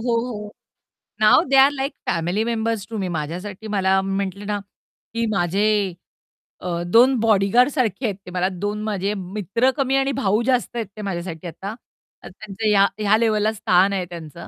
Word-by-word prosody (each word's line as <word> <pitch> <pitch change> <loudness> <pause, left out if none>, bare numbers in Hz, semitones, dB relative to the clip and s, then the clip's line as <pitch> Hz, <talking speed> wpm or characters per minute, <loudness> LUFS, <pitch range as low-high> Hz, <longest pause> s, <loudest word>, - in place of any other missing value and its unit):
हो, 235 0 0
हो. 210 -2 -7 0.7
Now 215 - +6
they 275 - +3
are 270 +2 +7
like 275 0 -3 0.2
family 175 +6 0
members 225 -3 -1
to 225 - -5
me. 190 -3 -2
माझ्यासाठी 180 +7 -5
मला 190 -2 +2
मी 195 0 -3
म्हटले 200 +2 -6
ना, 205 0 -2 0.5
की 230 0 0
माझे 195 +2 +1 0.7
अ, 175 -1 -3
2 250 +7 +5
बॉडीगार्डसारखे 225 - +2
आहेत 205 -3 -1
ते 180 - -9
मला 180 0 0 0.2
2 210 +1 -2
माझे 205 -1 -1
मित्र 205 +7 0
कमी 270 -1 +1
आणि 270 0 +1
भाऊ 210 -1 +2
जास्त 250 -1 0
आहेत 230 -4 -2
ते 215 - -6
माझ्यासाठी 175 -3 -5
आता. 195 +5 -6 0.5
तर - - -9
त्यांचं 215 +2 -5
ह्या 200 -1 +5
ह्या 210 0 +3
लेव्हलला 215 -1 +2
स्थान 195 -2 +3
आहे 185 -2 -1
त्यांचं 170 -2 -9
205 Hz, 175 wpm, -22 LUFS, 190-225 Hz, 0.7 s, are